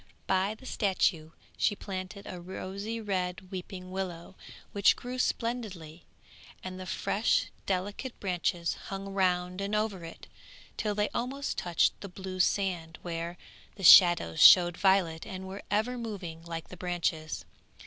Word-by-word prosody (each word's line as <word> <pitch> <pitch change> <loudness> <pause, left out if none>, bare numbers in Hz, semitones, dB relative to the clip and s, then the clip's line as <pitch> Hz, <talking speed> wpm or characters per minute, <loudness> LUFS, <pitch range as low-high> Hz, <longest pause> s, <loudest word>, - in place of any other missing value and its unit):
By 190 +3 +1
the 260 - -16
statue 185 -8 +1 0.3
she 205 - +2
planted 195 +1 -6
a 180 -1 -7
rosy 195 +5 -5
red 185 -3 -3
weeping 185 0 -7
willow 185 -2 -5 0.4
which 200 -1 +4
grew 250 +1 -6
splendidly, 200 -11 -3 0.6
and 185 0 -6
the 185 - -7
fresh 210 +3 +1 0.2
delicate 200 +7 -3
branches 175 -2 -1
hung 195 0 -5
round 180 -1 +1
and 200 +2 -1
over 210 -4 -1
it, 165 - -10 0.5
till 210 -1 -1
they 210 0 +1
almost 275 +4 -3
touched 175 -2 +1
the 200 - -7
blue 185 0 -7
sand 175 -4 0
where 170 0 -4 0.4
the 195 - -10
shadows 175 - +8
showed 175 -2 +9
violet, 190 -5 +2
and 190 -2 -6
were 195 +2 -7
ever 220 +5 0
moving 195 -8 -6
like 165 -1 -6
the 180 - -10
branches. 170 -3 -2
185 Hz, 140 wpm, -30 LUFS, 175-205 Hz, 0.6 s, showed